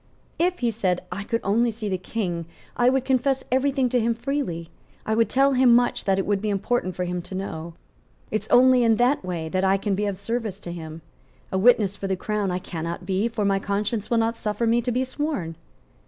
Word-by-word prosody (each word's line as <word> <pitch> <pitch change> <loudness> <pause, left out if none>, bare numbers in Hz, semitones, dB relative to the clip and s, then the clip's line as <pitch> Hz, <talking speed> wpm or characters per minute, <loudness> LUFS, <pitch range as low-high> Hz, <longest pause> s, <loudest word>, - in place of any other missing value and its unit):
"If," 355 +2 +2
he 240 -1 +2
said, 190 -5 0
"I 200 - -4
could 230 +3 -2
only 230 +5 +2
see 220 -1 -5
the 190 -2 -1
King, 175 -5 -3 0.3
I 245 +1 +4
would 265 0 +1
confess 265 +1 +1
every 265 +2 +2
thing 265 -2 +1
to 245 - +2
him 230 0 +1
freely. 230 - -3 0.3
I 220 - 0
would 230 +1 +2
tell 275 +1 +3
him 250 -2 +5
much 245 0 +1
that 195 -1 +2
it 195 - 0
would 200 -1 0
be 215 - -1
important 200 -1 -1
for 180 - -2
him 180 0 -3
to 180 +2 -8
know. 170 -3 -5 0.6
It 215 - 0
is - - -15
only 255 0 +6
in 225 -1 +4
that 245 +3 +2
way 175 -3 -3
that 185 +3 0
I 195 +1 +4
can 200 +1 -1
be 205 +2 0
of 200 -2 -3
service 215 -1 -3
to 175 - -6
him. 160 -1 -8 0.5
A 190 - 0
witness 210 -3 +4
for 195 - -5
the 190 - 0
Crown 210 +1 -2
I 180 - -1
cannot 170 0 -5
be 195 +4 0
for 225 -3 -2
my 195 -1 +2
conscience 205 +2 -2
will 235 - +2
not 225 +1 +1
suffer 215 +2 -1
me 230 +1 +3
to 245 +1 -2
be 250 +2 +1
sworn." 260 - -3
210 Hz, 235 wpm, -24 LUFS, 190-245 Hz, 0.6 s, only